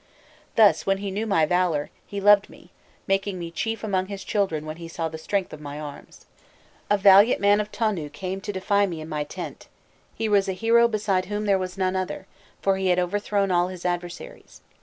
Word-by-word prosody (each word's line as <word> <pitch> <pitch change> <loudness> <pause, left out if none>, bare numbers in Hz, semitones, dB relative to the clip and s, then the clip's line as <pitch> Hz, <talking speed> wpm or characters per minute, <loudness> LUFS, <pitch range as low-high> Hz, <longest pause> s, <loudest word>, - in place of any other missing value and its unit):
Thus, 215 -3 +5
when 195 0 +2
he 200 0 -4
knew 210 +4 -2
my 165 -7 +3
valour, 170 -3 0 0.2
he 200 - -5
loved 205 0 +5
me, - - -17 0.3
making 195 0 0
me 170 -1 -6
chief 225 +6 -3
among 190 -3 0
his 200 -1 -7
children 190 -8 -1
when 155 +1 -6
he 170 -1 -8
saw 165 0 -3
the 160 0 -8
strength 195 +3 -2
of 155 - -9
my 145 0 -7
arms. 145 -2 -10 0.6
"A 205 - +4
valiant 200 +3 +6
man 205 +1 +4
of 210 0 -7
Tonu 200 -10 -1
came 190 +4 -5
to 205 - -4
defy 200 +1 +1
me 170 -4 -5
in 155 - -7
my 150 -2 -2
tent; 145 - -8 0.5
he 225 - -2
was 200 -2 +2
a - - 0
hero 230 +4 +4
beside 205 -4 0
whom 210 +1 -3
there 200 -2 +3
was 185 0 -5
none 185 -1 0
other, 185 -1 -3 0.4
for 195 -1 +2
he 190 0 -1
had 180 -1 +3
overthrown 200 +2 0
all 175 0 +3
his 185 -1 -9
adversaries. 175 - -5
190 Hz, 210 wpm, -24 LUFS, 175-205 Hz, 0.6 s, valiant